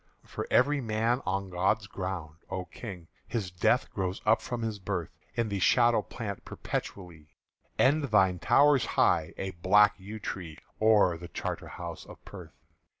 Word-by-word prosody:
"For -, -, -5 dB
every 140 Hz, +2 st, +3 dB
man 115 Hz, +2 st, 0 dB
on 95 Hz, 0 st, -2 dB
God's 95 Hz, +4 st, +1 dB
ground, 90 Hz, -6 st, -5 dB
O 95 Hz, -1 st, -4 dB
King, 90 Hz, -5 st, -9 dB, 0.2 s
His 105 Hz, -6 st, -3 dB
death 90 Hz, -, +1 dB
grows 95 Hz, 0 st, -2 dB
up 110 Hz, 0 st, +4 dB
from 120 Hz, -1 st, -4 dB
his 110 Hz, -2 st, -3 dB
birth 95 Hz, -3 st, -3 dB, 0.2 s
In 115 Hz, -2 st, 0 dB
the 100 Hz, -1 st, -2 dB
shadow 120 Hz, +4 st, +4 dB
plant 100 Hz, -4 st, -6 dB
perpetually; 85 Hz, -6 st, -6 dB, 0.5 s
And 145 Hz, +3 st, +3 dB
thine 95 Hz, -7 st, +3 dB
towers 140 Hz, -, +4 dB
high, 80 Hz, -1 st, +3 dB
a 95 Hz, 0 st, -3 dB
black 100 Hz, +4 st, +4 dB
yew 105 Hz, +3 st, -8 dB
tree, 85 Hz, -6 st, -6 dB, 0.2 s
O'er 105 Hz, -6 st, +4 dB
the 85 Hz, -, -8 dB
Charterhouse -, -, -6 dB
of -, -, -11 dB
Perth!" -, -, -11 dB
100 Hz, 150 wpm, -29 LUFS, 90-110 Hz, 0.5 s, up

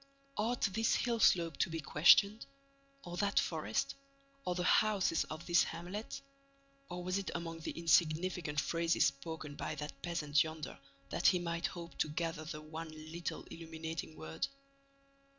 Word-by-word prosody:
Ought 230 Hz, +4 st, 0 dB
this 220 Hz, +3 st, +2 dB
hill 235 Hz, -2 st, 0 dB
slope 170 Hz, -7 st, +4 dB
to -, -, +2 dB
be 165 Hz, 0 st, -3 dB
questioned? 200 Hz, +9 st, +5 dB, 0.6 s
Or 175 Hz, 0 st, -6 dB
that 200 Hz, +1 st, +3 dB
forest? -, -, -1 dB, 0.5 s
Or 180 Hz, -, 0 dB
the 180 Hz, -, -1 dB
houses 195 Hz, -3 st, +3 dB
of 155 Hz, +2 st, -7 dB
this 175 Hz, -1 st, +5 dB
hamlet? 180 Hz, +6 st, -5 dB, 0.7 s
Or 180 Hz, 0 st, -5 dB
was 185 Hz, +2 st, 0 dB
it 195 Hz, -, -4 dB
among 165 Hz, -1 st, -4 dB
the 160 Hz, -, -5 dB
insignificant 160 Hz, 0 st, +2 dB
phrases 165 Hz, +3 st, +2 dB
spoken 145 Hz, +2 st, -3 dB
by 155 Hz, -, -3 dB
that 150 Hz, +1 st, -7 dB
peasant 150 Hz, -5 st, +2 dB
yonder 160 Hz, -1 st, -6 dB, 0.3 s
that -, -, +3 dB
he 185 Hz, -, +6 dB
might 170 Hz, -1 st, -1 dB
hope 170 Hz, -1 st, -9 dB
to -, -, +2 dB
gather 160 Hz, 0 st, -2 dB
the 155 Hz, -1 st, -6 dB
one 160 Hz, +1 st, -7 dB, 0.2 s
little 170 Hz, +1 st, -4 dB
illuminating 160 Hz, -, -6 dB
word? 80 Hz, 0 st, -3 dB
165 Hz, 150 wpm, -35 LUFS, 155-180 Hz, 0.7 s, he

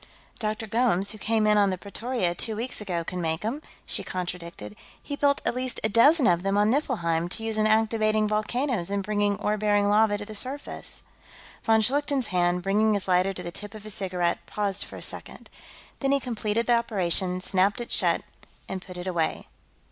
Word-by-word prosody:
"Dr. 215 Hz, 0 st, -2 dB
Gomes, 220 Hz, -3 st, +2 dB
who 215 Hz, -, -9 dB
came 220 Hz, +1 st, +1 dB
in 210 Hz, 0 st, +4 dB
on 200 Hz, -1 st, +4 dB
the 185 Hz, -, -2 dB
Pretoria, 200 Hz, -1 st, -2 dB
two 220 Hz, +5 st, -1 dB
weeks 235 Hz, +1 st, -4 dB
ago, 175 Hz, -5 st, -2 dB
can 180 Hz, +2 st, -4 dB
make 160 Hz, 0 st, -1 dB
them," 235 Hz, +8 st, -3 dB, 0.2 s
she -, -, -1 dB
contradicted. 170 Hz, -, -5 dB, 0.2 s
"He 285 Hz, -, -5 dB
built 285 Hz, 0 st, +2 dB
at -, -, +1 dB
least 255 Hz, 0 st, -2 dB
a 220 Hz, -, +2 dB
dozen 275 Hz, +7 st, +5 dB
of 175 Hz, -3 st, +4 dB
them 195 Hz, +1 st, 0 dB
on 210 Hz, +1 st, +4 dB
Niflheim, 175 Hz, -, 0 dB
to 225 Hz, -, -1 dB
use 225 Hz, -1 st, -1 dB
in 215 Hz, 0 st, +2 dB
activating 215 Hz, -1 st, +2 dB
volcanoes 215 Hz, -1 st, -1 dB
and 200 Hz, 0 st, -1 dB
bringing 205 Hz, 0 st, +1 dB
ore 210 Hz, 0 st, 0 dB
bearing 205 Hz, -1 st, +2 dB
lava 210 Hz, 0 st, +4 dB
to 205 Hz, -, -6 dB
the 215 Hz, -, -9 dB
surface." 260 Hz, +7 st, -3 dB, 0.6 s
Von 225 Hz, -1 st, +4 dB
Schlichten's 275 Hz, +1 st, +1 dB
hand, 180 Hz, -1 st, +1 dB
bringing 210 Hz, +3 st, +3 dB
his 200 Hz, -, -3 dB
lighter 185 Hz, +1 st, +3 dB
to 195 Hz, -, -5 dB
the 175 Hz, -, -5 dB
tip 205 Hz, +3 st, -8 dB
of 215 Hz, -, -9 dB
his 215 Hz, -1 st, -3 dB
cigarette, 180 Hz, -3 st, -1 dB
paused 205 Hz, -1 st, 0 dB
for -, -, -11 dB
a -, -, -6 dB
second. -, -, -4 dB, 0.5 s
Then 275 Hz, -1 st, +1 dB
he 280 Hz, -, +3 dB
completed 230 Hz, -3 st, -1 dB
the 240 Hz, -1 st, +4 dB
operation, 185 Hz, -4 st, 0 dB
snapped 190 Hz, +3 st, +2 dB
it 240 Hz, -, -6 dB
shut, -, -, +2 dB, 0.4 s
and 190 Hz, -1 st, -4 dB
put 180 Hz, -1 st, -10 dB
it 180 Hz, -, -6 dB
away. 170 Hz, -4 st, -1 dB
210 Hz, 200 wpm, -26 LUFS, 185-225 Hz, 0.6 s, dozen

